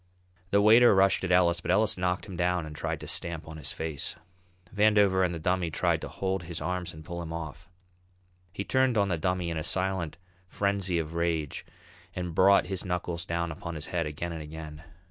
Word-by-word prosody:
The 100 +1 +3
waiter 115 +1 +7
rushed 95 0 +4
at 95 - -1
Ellis, 85 -1 +4
but - - -6
Ellis 105 +4 +3
knocked 90 0 -1
him 95 - -8
down 90 -1 0
and 75 -1 -8
tried - - -3
to - - -7
stamp 85 -2 -2
on 80 0 -8
his 75 - -3
face. 80 -3 -3 0.6
Vandover 105 -3 +4
and 90 - +1
the 85 - -4
Dummy 90 +1 0
tried 75 - +1
to - - -5
hold 95 -1 -2
his 85 -1 -6
arms 90 +2 -3
and 80 0 -12
pull 85 -1 -5
him 80 -1 -6
off. 80 +1 -7 0.8
He 100 - -4
turned 130 0 +2
on 100 -1 +3
the 85 -3 0
Dummy 90 0 -1
in 80 - -3
a 80 - -2
silent 90 -2 -1 0.3
frenzy 100 -2 0
of 80 -1 -3
rage 85 -3 -1 0.5
and 90 -2 -3
brought 95 +3 +5
his 95 -1 -3
knuckles 90 -2 -3
down 85 0 -2
upon 85 +1 -6
his 80 0 -4
head 85 -3 0
again 80 +3 -4
and 80 -1 -5
again. 75 0 -8
85 Hz, 205 wpm, -28 LUFS, 80-95 Hz, 0.8 s, waiter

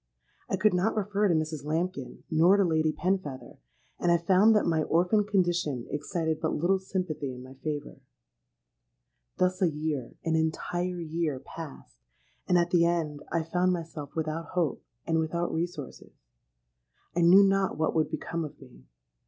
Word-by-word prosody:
I 195 - 0
could 210 +2 +3
not 185 +6 +1
refer 205 0 +1
to 175 - +3
Mrs. 155 -2 -2
Lambkin, 170 +5 -3
nor 170 +5 +5
to 200 - +4
Lady 160 -3 +2
Penfeather; 155 -9 -3 0.4
and 175 - +2
I 170 - +5
found 190 +6 +4
that 210 - +3
my 160 -2 +2
orphan 180 +7 +2
condition 175 - 0
excited 160 +2 -2
but 160 - 0
little 185 +5 +2
sympathy 180 -7 -3
in 125 - -10
my 130 +1 -11
favour. 150 -2 -4 1.4
Thus 185 0 +1
a 180 - +4
year—an 155 0 -3
entire 175 +3 -1
year—passed; 155 - -5 0.5
and 180 - +4
at 175 0 +1
the 175 -2 +5
end, 165 -4 0
I 165 -1 +1
found 180 +3 +1
myself 165 -4 -6
without 160 +1 -2
hope, 170 -5 0 0.2
and 165 -1 +1
without 170 +2 -1
resources. 160 -4 -5 1.0
I 175 - +2
knew 180 +4 +8
not 195 -4 +2
what 155 0 +1
would 160 -1 +1
become 165 +1 -3
of 150 - -8
me. 60 +1 -16
165 Hz, 155 wpm, -28 LUFS, 155-180 Hz, 1.4 s, knew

